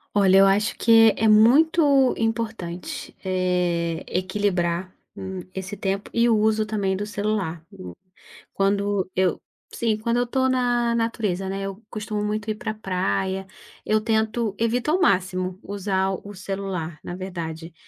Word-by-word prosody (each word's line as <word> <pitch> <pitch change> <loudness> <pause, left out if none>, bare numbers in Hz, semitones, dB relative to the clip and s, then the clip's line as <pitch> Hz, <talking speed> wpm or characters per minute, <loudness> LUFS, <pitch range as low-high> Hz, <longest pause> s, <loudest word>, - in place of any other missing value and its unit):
Olha, 195 -1 +5
eu 195 - +7
acho 200 +3 +2
que 225 -1 +6
é 225 - +1
muito 275 +5 +5
importante, 225 -6 -4
eh, 180 -3 0
equilibrar, 185 -1 -1 0.2
hum, 190 0 -6 0.2
esse 190 +2 -5
tempo 195 0 -2
e 235 0 +3
o 230 - +4
uso 215 0 +2
também 200 -3 -1
do 205 - -3
celular 205 -6 -2
o 195 -2 -10 0.6
Quando 200 -1 0
eu 185 -2 +1 0.3
Sim, 225 -2 0
quando 230 +2 -1
eu 245 - +2
estou 260 +2 +1
na 245 -2 +1
natureza, 220 -5 -1
né, 195 +1 -3
eu 195 +1 -6
costumo 215 -1 -4
muito 210 +1 -2
ir - - -3
pra 220 0 -4
praia. 190 -1 -2 0.4
Eu 215 0 +2
tento 220 0 0
evito 235 +5 +1
ao 360 - +2
máximo 185 - +1
usar 195 -1 -1 0.2
o 205 - -8
celular, 190 -4 -4
na 175 - -6
verdade. 170 -3 -6
200 Hz, 150 wpm, -24 LUFS, 185-225 Hz, 0.6 s, eu